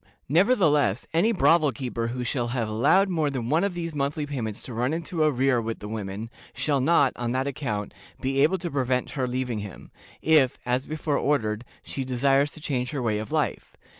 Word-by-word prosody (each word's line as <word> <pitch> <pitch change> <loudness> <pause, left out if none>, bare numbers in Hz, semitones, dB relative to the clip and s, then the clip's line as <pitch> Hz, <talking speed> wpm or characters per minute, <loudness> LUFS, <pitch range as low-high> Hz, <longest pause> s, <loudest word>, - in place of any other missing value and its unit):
Nevertheless, 155 - +3
any 175 +8 +3
brothel 165 -7 +4
keeper 120 -3 -3
who 125 +1 -3
shall 120 0 -1
have 120 -2 -1
allowed 120 - +3
more 160 -5 +1
than 125 -4 -3
one 160 +4 +3
of 200 -3 -1
these 165 -2 -4
monthly 145 +1 -1
payments 115 -7 -4
to 125 - -7
run 125 +6 0
into 165 0 -3
arrear 135 -4 +3
with 115 0 -4
the 105 - -8
women, 105 +1 -5 0.2
shall 145 -3 +1
not, 140 -2 +4
on 120 0 -2
that 130 +1 0
account, 120 -8 -3 0.3
be 135 +1 0
able 160 +6 +4
to 175 -2 -5
prevent 130 -2 0
her 130 -2 -1
leaving 125 -2 -2
him, 100 -3 -9 0.3
if, 150 -5 +4
as 125 +2 0
before 155 -1 -1
ordered, 115 -6 0 0.2
she 135 - -4
desires 135 +3 +2
to - - -10
change 125 -5 -2
her 140 -3 -3
way 105 -3 0
of 110 - -6
life. - - -2
135 Hz, 195 wpm, -26 LUFS, 120-150 Hz, 0.3 s, brothel